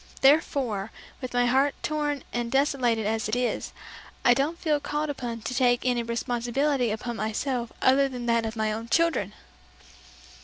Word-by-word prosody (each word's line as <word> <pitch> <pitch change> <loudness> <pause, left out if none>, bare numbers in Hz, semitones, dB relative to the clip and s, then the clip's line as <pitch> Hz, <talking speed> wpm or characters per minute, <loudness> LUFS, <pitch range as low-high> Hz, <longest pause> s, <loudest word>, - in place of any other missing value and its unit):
Therefore, 270 -8 +3 0.3
with 255 - -5
my 245 0 +3
heart 270 +3 +2
torn 295 -2 -1
and 240 -1 -2
desolated 260 -5 +1
as 220 0 -1
it 215 - 0
is, 245 0 -1 0.5
I 245 - +7
don't 285 +6 0
feel 305 -4 +1
called 295 +1 -2
upon 240 -4 -5
to 250 - -3
take 245 -1 +2
any 245 -1 +2
responsibility 240 +3 0
upon 225 +2 -4
myself 235 +2 -2
other 275 +1 +4
than 250 -2 -6
that 235 -1 +2
of 225 0 -4
my 215 -1 0
own 225 +2 -5
children!'" 320 - +1
245 Hz, 160 wpm, -26 LUFS, 230-275 Hz, 0.5 s, I